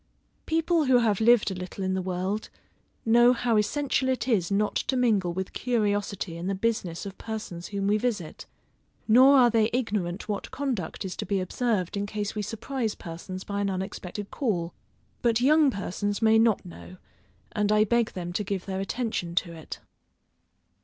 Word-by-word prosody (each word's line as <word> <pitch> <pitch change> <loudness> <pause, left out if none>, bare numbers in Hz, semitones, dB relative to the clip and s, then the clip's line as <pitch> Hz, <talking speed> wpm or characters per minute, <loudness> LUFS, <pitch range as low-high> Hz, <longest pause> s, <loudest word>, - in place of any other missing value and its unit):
People 325 0 +2
who 260 -2 +5
have 225 -4 +2
lived 230 -2 +5
a - - -2
little 185 +1 -6
in 190 0 0
the 190 - 0
world, 185 +3 -3 0.6
know 240 +2 +6
how 240 -1 0
essential 260 +4 +1
it 255 -2 -1
is 205 -9 +2
not 205 +1 +1
to 260 - 0
mingle 210 -8 +2
with 190 +2 -4
curiosity 205 -6 -1
in 170 +2 -5
the 195 - 0
business 190 -5 -2
of 195 -1 -8
persons 210 -6 -6
whom 200 -1 -3
we 210 +2 +2
visit; 210 -9 -3 0.6
nor 260 +5 +7
are 245 -2 +6
they 220 -1 +3
ignorant 210 -7 -2
what 205 -2 -3
conduct 245 - -3
is 185 - -4
to - - -3
be 200 -1 +1
observed 185 0 -1
in 200 0 -2
case 210 0 -3
we 210 - -3
surprise 225 +2 -3
persons 180 +3 -7
by 200 0 -3
an 200 - 0
unexpected 190 +1 -5
call; 180 - -1 0.5
but 230 -1 +2
young 295 +3 +5
persons 205 -2 -2
may 225 0 +5
not 225 -3 +3
know, 180 +1 -11 0.5
and 210 -1 0
I 215 0 +5
beg 235 +1 +1
them 175 -1 -5
to 210 - -1
give 195 -2 -3
their 190 -1 -3
attention 195 -4 -3
to 175 -1 0
it. 160 -2 -9
210 Hz, 180 wpm, -27 LUFS, 185-235 Hz, 0.6 s, nor